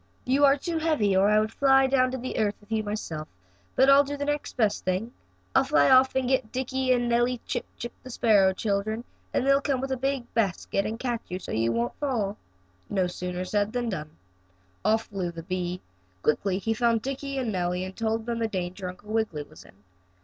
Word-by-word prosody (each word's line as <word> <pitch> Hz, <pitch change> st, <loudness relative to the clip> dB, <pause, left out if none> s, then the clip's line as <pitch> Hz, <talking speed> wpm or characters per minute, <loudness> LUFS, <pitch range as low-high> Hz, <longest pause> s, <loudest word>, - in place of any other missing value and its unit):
You 275 Hz, +3 st, +4 dB
are 275 Hz, 0 st, +5 dB
too 330 Hz, +3 st, -2 dB
heavy, 295 Hz, -12 st, +2 dB
or 195 Hz, +2 st, +4 dB
I 210 Hz, 0 st, +5 dB
would 215 Hz, 0 st, 0 dB
fly 270 Hz, +1 st, +4 dB
down 260 Hz, -1 st, +3 dB
to 255 Hz, 0 st, -4 dB
earth 210 Hz, -2 st, +1 dB
with 205 Hz, +1 st, -22 dB
you 220 Hz, -1 st, +1 dB
myself, 205 Hz, -8 st, -4 dB, 0.5 s
but 265 Hz, -, +5 dB
I'll 275 Hz, +1 st, +7 dB
do 285 Hz, +1 st, -5 dB
the 285 Hz, -, -2 dB
next 295 Hz, 0 st, -3 dB
best 215 Hz, -4 st, +1 dB
thing. 185 Hz, +6 st, -1 dB, 0.4 s
I'll -, -, +5 dB
fly 145 Hz, -1 st, +4 dB
off 260 Hz, 0 st, +6 dB
and 260 Hz, -1 st, +1 dB
get 255 Hz, -4 st, +1 dB
Dickie 260 Hz, 0 st, -1 dB
and 245 Hz, -1 st, +2 dB
Nellie 240 Hz, +1 st, +2 dB
Chip -, -, -3 dB
Chip, 240 Hz, -, -5 dB
the 255 Hz, -, -11 dB
sparrow 210 Hz, -6 st, +4 dB
children, 210 Hz, +3 st, -1 dB, 0.3 s
and -, -, 0 dB
they'll 275 Hz, 0 st, +4 dB
come 275 Hz, -3 st, 0 dB
with 270 Hz, +1 st, -3 dB
a 265 Hz, -, 0 dB
big 270 Hz, -1 st, -2 dB
basket 195 Hz, -2 st, 0 dB
and 225 Hz, -, -4 dB
catch 240 Hz, -3 st, -2 dB
you 180 Hz, -, -4 dB
so 185 Hz, -, -8 dB
you 115 Hz, +1 st, +1 dB
won't 115 Hz, +1 st, -1 dB
fall." 225 Hz, -8 st, -1 dB, 0.5 s
No 190 Hz, -2 st, +1 dB
sooner 180 Hz, 0 st, -4 dB
said 205 Hz, +2 st, 0 dB
than 245 Hz, -1 st, -1 dB
done. 155 Hz, -7 st, -4 dB, 0.7 s
Off 220 Hz, +2 st, +3 dB
flew 190 Hz, -5 st, -4 dB
the 165 Hz, -1 st, -8 dB
bee. 180 Hz, 0 st, -3 dB, 0.4 s
Quickly 185 Hz, +5 st, +1 dB
he 225 Hz, +3 st, -1 dB
found 230 Hz, 0 st, +1 dB
Dickie 275 Hz, +1 st, -4 dB
and 250 Hz, -4 st, -1 dB
Nellie 180 Hz, -1 st, -1 dB
and 190 Hz, 0 st, -8 dB
told 225 Hz, 0 st, -1 dB
them 235 Hz, -1 st, -2 dB
the 225 Hz, -, +1 dB
danger 185 Hz, -2 st, -4 dB
Uncle 205 Hz, +4 st, -9 dB
Wiggily 215 Hz, -10 st, -1 dB
was 155 Hz, +1 st, -15 dB
in. 100 Hz, +2 st, -20 dB
220 Hz, 215 wpm, -27 LUFS, 190-260 Hz, 0.7 s, I'll